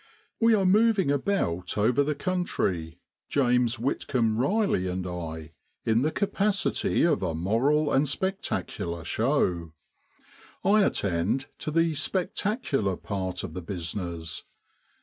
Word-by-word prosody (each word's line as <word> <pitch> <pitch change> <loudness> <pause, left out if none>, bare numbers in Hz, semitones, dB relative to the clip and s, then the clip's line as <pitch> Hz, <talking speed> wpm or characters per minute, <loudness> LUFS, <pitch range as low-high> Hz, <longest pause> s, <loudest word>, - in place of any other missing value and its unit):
We 230 -1 +5
are 195 -2 +1
moving 200 -4 +4
about 140 - -1
over 115 +6 +3
the 150 +1 -1
country, 100 - -2 0.3
James 125 -3 +2
Whitcomb 120 -2 0
Riley 185 - +1
and 90 0 -3
I, 80 -3 -6 0.3
in 110 +1 +3
the 150 - +2
capacity 200 +2 +1
of 160 -4 +3
a 85 -4 -1
moral 135 - +2
and 140 +1 +3
spectacular 135 - -3
show, 90 - 0 0.9
I 205 +2 +5
attend 100 - 0
to - - -3
the 165 +1 +2
spectacular 175 - -1
part 95 -3 -4
of - - -6
the 90 - -5
business. 85 -2 -4
125 Hz, 120 wpm, -27 LUFS, -, 0.9 s, We